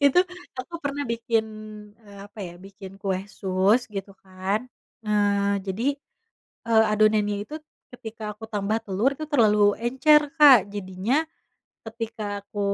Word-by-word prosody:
Itu 285 +6 +5 0.3
aku 255 +7 -7
pernah 285 0 -3
bikin, 230 -1 0 0.6
eee, 205 -2 -14
apa 205 +1 -12
ya, 175 -3 -6
bikin 195 +1 -12
kue 190 -1 -2
sus 195 +5 +1
gitu 195 -1 -6
kan. 190 +4 -2 0.4
Eee, 200 -1 +1
jadi, 190 +4 -4 0.8
eee, 225 -1 +5
adonannya 210 -1 +2
itu 305 - -8 0.4
ketika 220 -3 -7
aku 215 +2 -10
tambah 210 0 -1
telur 210 +8 +1
itu 310 +3 -6
terlalu 210 -7 +4
encer, 265 +6 +4 0.2
Kak. 275 - +8
Jadinya 200 +8 -1 0.7
ketika 220 -3 -5
aku 205 0 -7
210 Hz, 130 wpm, -25 LUFS, 200-235 Hz, 0.8 s, Kak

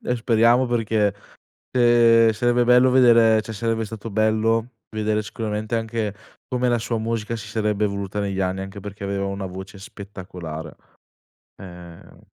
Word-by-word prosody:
Eh, 125 - -1
speriamo 115 +2 +3
perché, 110 -4 0 0.6
uhm, 115 -1 +5
sarebbe 120 +2 +1
bello 125 +1 +5
vedere 115 -4 +5
cioè 110 - -8
sarebbe 115 +1 -1
stato 110 +1 -8
bello 110 +2 +1 0.2
vedere 110 0 -1
sicuramente 110 0 -4
anche 110 -2 -3 0.3
come 125 0 0
la 120 - +2
sua 115 +1 -2
musica 115 0 -3
si 110 - -8
sarebbe 105 -1 -1
evoluta 100 0 -3
negli 100 -1 -2
anni, 95 0 -1
anche 95 +1 -8
perché 100 0 -9
aveva 100 0 -2
una 100 0 -4
voce 95 +2 -9
spettacolare. 90 -5 -9 0.9
Ehm 90 -2 -12
110 Hz, 145 wpm, -22 LUFS, 100-115 Hz, 0.9 s, uhm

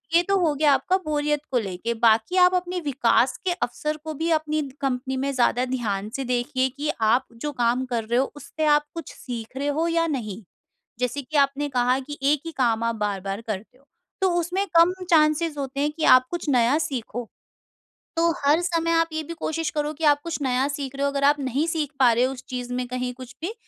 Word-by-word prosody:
ये 345 - +7
तो 395 +2 +1
हो 325 -4 +2
गया 295 0 +4
आपका 370 +6 +2
बोरियत 295 0 0
को 255 - +2
लेके, 200 +3 -3
बाकी 225 +8 +3
आप 360 0 +6
अपने 360 0 -1
विकास 250 -2 +2
के 360 - +2
अवसर 305 -3 -3
को 315 - -4
भी 320 +3 -2
अपनी 310 -1 +1 0.2
कंपनी 260 0 -1
में 275 +1 -1
ज़्यादा 250 0 +2
ध्यान 215 -6 -2
से 270 - -2
देखिए 255 +2 0
कि 295 +2 -2 0.2
आप 250 +2 +3 0.2
जो 295 - -1
काम 240 +2 +2
कर 240 -3 -2
रहे 235 +3 +1
हो 270 - 0
उससे 310 +1 -4
आप 295 0 0
कुछ 330 -4 -7
सीख 240 0 -7
रहे 285 +1 -2
हो 335 - +2
या 330 0 +1
नहीं, 225 -8 -4 0.6
जैसे 250 +3 -1
कि 295 +3 -3
आपने 280 +1 +2
कहा 250 0 +2
कि 290 +2 -8
एक 285 +1 +2
ही - - -4
काम 230 -3 +2
आप 230 0 0
बार-बार 200 -1 -3
करते 215 +4 -5
हो, 275 - -28 0.4
तो 380 - +4
उसमें 360 +4 -1
कम 340 +2 +6 0.2
चांसेज़ 305 -1 +3
होते 275 0 -4
हैं 295 - +1
कि 315 - -3
आप 255 0 +3
कुछ 345 -4 -3
नया 250 +2 +3
सीखो। 245 -3 -5 0.9
तो 335 0 +4 0.2
हर 305 +4 +4
समय 335 -1 0
आप 330 0 +3
ये 315 - -1
भी 335 - -7
कोशिश 320 -1 -2
करो 300 0 -1
कि 320 - -9
आप 290 - +1
कुछ 335 -3 -4
नया 260 +1 +1
सीख 280 -1 -5
रहे 275 - -2
हो, - - +2
अगर 280 0 -2
आप 290 +1 +5
नहीं 270 +2 0
सीख 315 -3 -1
पा 245 -3 +6
रहे 240 +2 +2
हो 260 - +1
उस 255 - -10
चीज़ 250 -1 -5
में 250 0 -2
कहीं 250 0 -3
कुछ 255 -1 -11
भी, 365 +7 -3
275 Hz, 225 wpm, -24 LUFS, 245-310 Hz, 0.9 s, ये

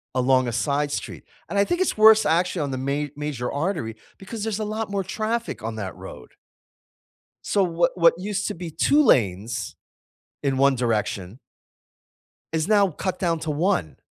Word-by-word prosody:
along 130 0 +3
a - - -1
side 145 +4 0
street. - - -5 0.3
And 200 - 0
I 200 - +4
think 350 - -1
it's 375 - 0
worse, 220 0 +7
actually, 175 0 +1
on 140 -2 -2
the 130 - -3
ma 140 +3 -1
major 145 -5 -3
artery 145 - -2 0.2
because 205 +2 -7
there's 220 -1 -2
a - - -1
lot 215 0 -3
more 200 -1 -1
traffic 220 - -3
on 110 0 -4
that 100 -4 -5
road. 65 - -10 1.2
So 200 - +2
what 170 -1 +1
what 170 -2 +5
used 200 +2 -2
to - - -4
be 170 -1 -7
2 285 - +3
lanes 110 - +1 0.7
in 135 -2 0
1 140 0 +4
direction 110 -4 -2 1.1
is 160 +2 -1
now 205 -2 +4
cut 185 +3 -4
down 170 -3 0
to 160 - -3
1. 150 - 0
160 Hz, 175 wpm, -24 LUFS, 130-200 Hz, 1.2 s, worse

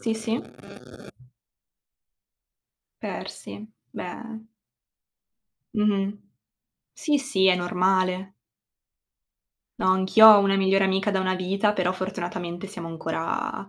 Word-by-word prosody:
Sì, 225 -1 -1
sì. 225 +1 -3 2.6
Persi, 100 +1 -8 0.3
beh. 220 +4 -8 1.3
Mh-mh. 205 -1 0 0.8
Sì, 295 -3 0
sì, 230 -9 +1
è 185 - +5
normale. 185 +1 0 1.5
No, - - 0
anch'io 190 +4 +6
ho 210 -2 +10
una 195 0 +2
migliore 195 0 +2
amica 195 +2 0
da 190 - 0
una 185 0 0
vita, 195 +3 0
però 185 -3 0
fortunatamente 180 -1 -5
siamo 175 -4 -8
ancora, 165 +3 -4
190 Hz, 95 wpm, -24 LUFS, 180-210 Hz, 2.6 s, ho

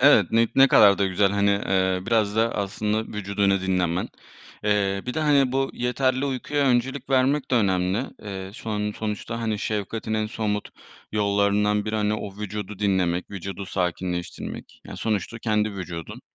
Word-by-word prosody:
Evet, 125 -9 +6
ni 115 0 +3
ne 135 0 +7
kadar 100 -2 +6
da 100 - +2
güzel, 95 +1 +2
hani, 100 0 +2
eee, 95 -2 +1
biraz 110 -2 +1
da 115 +1 +2
aslında 105 +2 -1
vücudunu 100 -1 +1
dinlemen. 90 -2 0 0.6
Eee, 100 -2 +1
bir 125 - -3
de, 155 - -1
hani, 140 -4 +3
bu 135 0 0
yeterli 130 +2 0
uykuya 140 +1 -1
öncelik 130 +2 0
vermek 135 +2 +2
de 130 - +3
önemli. 95 0 +2 0.2
Eee, 95 -2 -6
son 105 -2 -3
sonuçta, 110 +2 -4
hani, 110 -2 -1
şefkatin 110 +1 -3
en 110 0 0
somut 105 -2 -2 0.4
yollarından 105 0 +2
biri, 110 0 -2
hani, 105 0 +1
o 100 -2 -6
vücudu 105 -1 -5
dinlemek, 95 -3 0
vücudu 100 0 -6
sakinleştirmek 90 -1 -4
yani - - -9
sonuçta 110 +1 -2
kendi 110 -2 0
vücudun. 85 -4 -7
105 Hz, 160 wpm, -24 LUFS, 100-115 Hz, 0.6 s, ne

